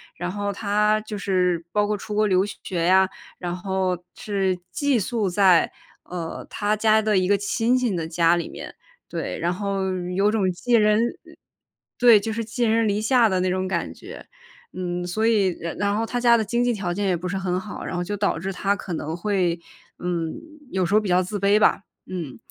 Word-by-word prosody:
然 175 +1 -4
后 205 0 -3
她 210 +1 +1
就 215 -1 -6
是 180 -4 0
包 210 0 +3
括 210 0 -1
出 210 +1 -6
国 215 0 +3
留 190 0 +3
学 175 -4 -4
呀， 190 +1 +5 0.3
然 175 -1 -4
后 185 -1 -1
是 195 -4 -1
寄 285 -3 +1
宿 220 0 -1
在， 185 -2 +4 0.3
呃， 170 -2 -6
她 210 +1 -1
家 220 0 +4
的 215 -2 +2
一 185 - +2
个 205 +1 +4
亲 225 +5 +1
戚 245 -5 0
的 165 -2 -2
家 170 +1 +3
里 170 - -3
面， - - -9 0.4
对， - - -4
然 175 +2 0
后 195 0 -2 0.3
有 205 +2 +3
种 200 -4 +1
寄 240 +7 -2
人 210 -1 +4 1.0
对， 235 -3 +7
就 220 +2 -3
是 230 +1 -2
寄 235 +2 -1
人 225 0 +2
篱 205 0 +1
下 230 0 +4
的 185 - +1
那 185 0 +1
种 185 0 -1
感 170 -3 -2
觉。 - - -11 0.5
嗯， 175 -1 -3
所 215 +5 -1
以 200 -6 +3
然 170 0 -5
然 205 0 0
后 225 - 0
她 245 +2 -2
家 235 -1 +5
的 220 - +2
经 235 +3 -1
济 245 -1 +2
条 180 -4 -2
件 200 +1 -1
也 180 - +2
不 180 +2 -4
是 195 - -2
很 185 -1 -1
好， 200 +3 -6
然 - - -4
后 175 - -1
就 205 +3 -4
导 200 -4 0
致 190 +3 -4
她 200 +2 0
可 195 - -8
能 160 +1 -3
会， 180 -2 0 0.4
嗯， 170 -2 -2 0.4
有 185 -1 +1
时 195 - -2
候 215 - +6
比 205 - -4
较 180 +1 +3
自 205 +3 -4
卑 200 +2 +4
吧， 210 - +3 0.2
嗯。 170 -8 -6
195 Hz, 230 characters per minute, -23 LUFS, 180-215 Hz, 1.0 s, 对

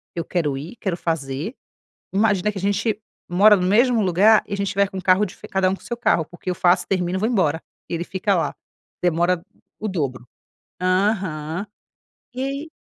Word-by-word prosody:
eu 170 - -2
quero 150 -7 -1
ir, 160 - -7
quero 190 -5 -1
fazer 160 - -3 0.6
Imagina 205 -1 +2
que - - -7
a - - -4
gente 205 +2 0 0.3
mora 205 +4 +6
no 180 - -1
mesmo 235 +3 +4
lugar 200 +4 +5
e - - -5
a - - +1
gente 200 0 -1
vai 200 0 +3
com 190 - -8
o 185 - -4
carro 190 +3 +4
de 185 - -10
cada 190 -1 +2
um 190 - 0
com - - -19
seu 240 - -4
carro, 170 -8 +2
porque 175 +3 -8
eu 180 - -1
faço, 175 +1 +3
termino, 185 -1 0
vou 220 - +1
embora 165 -9 +1 0.3
e - - -4
ele 170 +1 -1
fica 195 +1 0
lá. 170 - -1 0.5
Demora 175 0 +2 0.4
o 215 - -3
dobro. 135 - -3 0.5
Aham. 185 -3 0 0.7
E 255 - -3
aí 275 +3 -4
190 Hz, 195 wpm, -22 LUFS, 170-210 Hz, 0.7 s, mora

